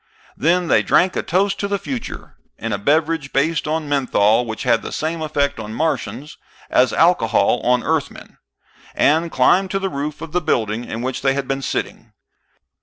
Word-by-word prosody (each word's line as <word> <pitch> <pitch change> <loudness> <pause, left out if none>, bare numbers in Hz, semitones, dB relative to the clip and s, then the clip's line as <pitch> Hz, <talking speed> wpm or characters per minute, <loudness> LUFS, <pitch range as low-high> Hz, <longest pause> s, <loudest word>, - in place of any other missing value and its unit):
Then 175 +3 +1
they - - +4
drank 185 +1 +2
a - - 0
toast 195 +3 0
to 200 - -1
the 200 0 -1
future 245 +3 -7 0.2
in 115 0 -4
a 100 - -2
beverage 155 +3 0
based 155 +3 0
on 155 0 -2
menthol, 120 -5 +2
which 110 0 -5
had 120 -3 +2
the - - -7
same 160 +1 -3
effect 140 -3 -1
on 110 0 -6
Martians 155 -1 -3 0.3
as - - +4
alcohol - - +3
on 125 0 +2
Earthmen 160 -3 -3 0.6
and 160 +3 +2
climbed 185 +9 +3
to 195 - -1
the 195 0 -2
roof 145 -1 -4
of 165 - -7
the 180 +2 0
building 115 -6 -1
in 115 +2 -5
which 130 0 -3
they 135 0 +2
had 140 -2 -3
been 135 0 -2
sitting. - - -4
150 Hz, 180 wpm, -20 LUFS, 125-165 Hz, 0.6 s, they